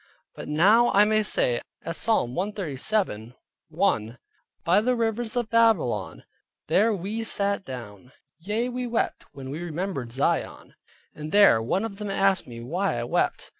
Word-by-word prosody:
But - - -9
now 205 +11 +4
I 205 +1 +6
may 215 0 +2
say - - 0 0.2
as - - -3
Psalm 170 - +1
137.1, 160 - -2 0.5
"By 180 +5 +3
the 250 +3 +1
Rivers 230 0 -2
of 240 -2 -2
Babylon, 195 - +2 0.4
there 220 +4 +3
we 210 +3 -3
sate 200 -2 -1
down: 125 - -9 0.3
yea, 210 +7 -2
we 250 0 -4
wept 235 -1 -2
when 135 -2 -8
we 155 +4 -5
remembered 170 -7 -4
Zion." 135 +4 -2 0.4
There 155 - +4
one 185 - -1
of 200 -3 -7
them 210 0 -5
asked 195 -1 +1
me 115 -1 -9
why 170 +4 -1
I 120 - -2
wept. 120 - -1
195 Hz, 145 wpm, -25 LUFS, 135-220 Hz, 0.5 s, I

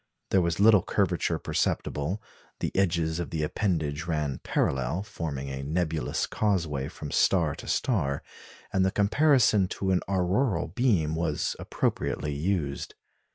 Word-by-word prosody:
There 95 - +4
was 85 0 -1
little 105 -1 +7
curvature - - 0
perceptible; 80 +9 -1 0.4
the - - -3
edges 85 -4 +1
of 85 - -3
the 80 -2 -2
appendage 80 -3 -1
ran 75 -5 -1
parallel, 65 +8 0
forming 75 -10 -5
a 65 0 -4
nebulous 80 +2 -1
causeway 80 -10 0
from 75 -2 -8
star - - +3
to - - -9
star; 80 - 0 0.5
and 95 - +3
the 95 - +3
comparison 110 -1 +4
to 95 +1 -2
an 90 - +2
auroral 95 +5 +1
beam 100 -12 +1
was 80 -2 -1
appropriately 75 - -1
used. 75 -2 -2
85 Hz, 135 wpm, -27 LUFS, 75-100 Hz, 0.5 s, little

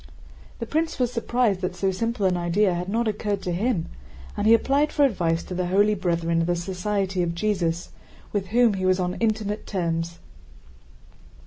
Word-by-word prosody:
The 230 - -4
prince 315 +6 -1
was 250 -1 0
surprised 230 -4 +1
that 180 -1 -2
so 190 +1 0
simple 230 +2 -1
an 185 -1 +3
idea 175 +3 +2
had 175 +2 -3
not 230 +3 0
occurred 205 -2 -2
to 180 - -2
him, 190 0 0 0.5
and 205 - 0
he 225 - +7
applied 280 +5 +1
for 290 - +4
advice 170 -9 0
to - - -7
the 180 0 -1
holy 205 +3 +3
brethren 170 -3 0
of 165 - -1
the 175 - +1
Society 190 +1 -2
of 170 -1 -1
Jesus, 175 -3 -1 0.4
with 200 -2 -1
whom 235 +2 +4
he 190 -1 -2
was 185 0 +3
on 180 0 -1
intimate 215 -2 -1
terms. 170 -3 -2
195 Hz, 185 wpm, -24 LUFS, 175-220 Hz, 0.5 s, he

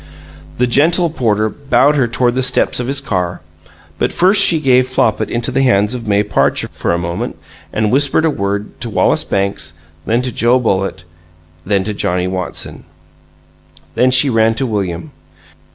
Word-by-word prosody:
The 125 - +2
gentle 160 +7 +2
porter 110 -7 0
bowed 140 +3 +1
her 130 -4 +2
toward 120 +1 0
the 130 - -1
steps 125 -1 +1
of 125 - -3
his 140 +1 +2
car; 90 -9 -3 0.6
but - - 0
first 195 +3 +4
she 165 - +5
gave 130 -3 +3
Flopit 120 -4 0
into 120 0 -2
the 135 - 0
hands 105 -4 +2
of 120 -3 -6
May 100 0 +2
Parcher, 105 - 0
for - - -3
a 85 - +1
moment, 85 0 -4 0.3
and 110 -1 -1
whispered 140 +4 +2
a 160 - +2
word 100 -3 -4
to - - -3
Wallace - - +1
Banks; 100 -5 -2 0.3
then 120 +3 +1
to 125 - -2
Joe 120 +2 +2
Bullitt; 95 -6 -2 0.6
then 100 -2 +1
to 105 +2 -4
Johnnie 90 -2 -1
Watson; 90 -6 -4 1.1
then 125 - +2
she 130 +3 +5
ran 115 -2 +2
to 135 - -1
William. 100 - -4
120 Hz, 170 wpm, -15 LUFS, 100-135 Hz, 1.1 s, she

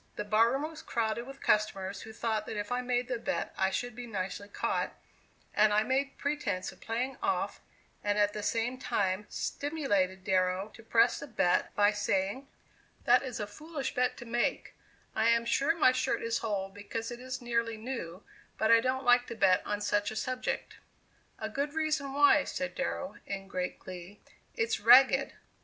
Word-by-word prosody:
The 210 - -4
bar 220 +3 +4
room 275 +4 -1
was 320 -1 -10
crowded 230 +1 -2
with 275 0 -10
customers 195 -2 +1
who 220 - -9
thought 220 -1 -2
that 215 - -4
if 205 +3 -4
I 250 0 +1
made 245 0 0
the 250 -2 -2
bet - - -2
I 190 - +2
should 245 +4 -3
be 245 0 -7
nicely 195 -1 -4
caught, 205 - -2 0.6
and 215 0 +4
I 210 +1 +4
made 275 +3 -1
pretence 285 -11 -2
of - - -19
playing 250 +4 -2
off 390 0 -1 0.4
and 205 0 +1
at 205 0 +3
the 210 - -4
same 230 +4 -1
time 195 -3 -1
stimulated 205 - -1
Darrow 185 0 +1
to 230 - -13
press 230 +1 +3
the 285 - -7
bet 195 -7 +1
by 205 0 +5
saying: 205 +5 -1 0.6
"That - - +6
is 255 -3 -5
a 210 - -1
foolish 285 +5 -5
bet 250 0 +1
to 240 - -9
make; 240 +1 -1 0.4
I 225 - +3
am 230 0 +3
sure 280 +7 +2
my 300 -6 +5
shirt 255 +1 -1
is 230 0 0
whole 200 -3 -2
because 205 +4 -5
it 240 - -7
is 255 +1 -5
nearly 235 -2 -1
new; 215 -6 -6 0.3
but 220 - +2
I 230 - +8
don't 260 +2 -1
like 245 0 +5
to 235 - -6
bet 190 -4 +4
on 205 0 -2
such 205 0 +1
a 220 - -7
subject." 255 +3 -3 0.6
"A - - -4
good 290 +2 -3
reason 310 -3 0
why," 285 +1 +5
said 270 0 -3
Darrow, 275 +1 -3
in 195 -1 -5
great 180 -2 -3
glee; 185 +2 -10 0.4
"it's 450 -1 0
ragged. - - +6
230 Hz, 185 wpm, -31 LUFS, 205-260 Hz, 0.6 s, I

